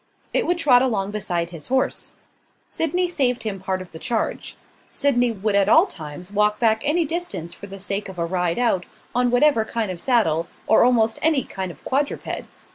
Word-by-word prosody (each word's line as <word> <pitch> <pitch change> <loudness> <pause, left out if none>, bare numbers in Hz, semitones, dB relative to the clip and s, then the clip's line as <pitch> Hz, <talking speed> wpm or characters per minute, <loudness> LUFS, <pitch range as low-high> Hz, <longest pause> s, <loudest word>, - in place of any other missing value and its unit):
It - - +1
would 350 0 +1
trot 265 -7 +5
along 205 -6 0
beside 175 -5 -2
his 165 -4 -6
horse. 260 0 0 0.5
Sydney 355 +3 0
saved 260 -8 0
him 205 -3 -3
part 190 0 -3
of 180 - -18
the 160 - -9
charge. 225 +4 -3 0.3
Sydney 245 -4 +2
would 210 -1 -2
at 200 0 +3
all 320 - +7
times 165 - -7
walk 210 +1 +2
back 220 -2 +2
any 315 +3 +2
distance 325 - -4
for 200 - -10
the 195 0 -9
sake 200 +1 -3
of 190 - -10
a 170 - 0
ride 175 -1 -1
out, 230 -7 +1 0.3
on 245 0 +2
whatever 245 -1 +4
kind 220 -3 -2
of 175 -2 -6
saddle, 170 - +2 0.2
or 220 - +5
almost 230 -2 +3
any 310 -5 +3
kind 190 -1 -5
of 150 - -17
quadruped. 285 +2 -2
220 Hz, 195 wpm, -22 LUFS, 185-260 Hz, 0.5 s, all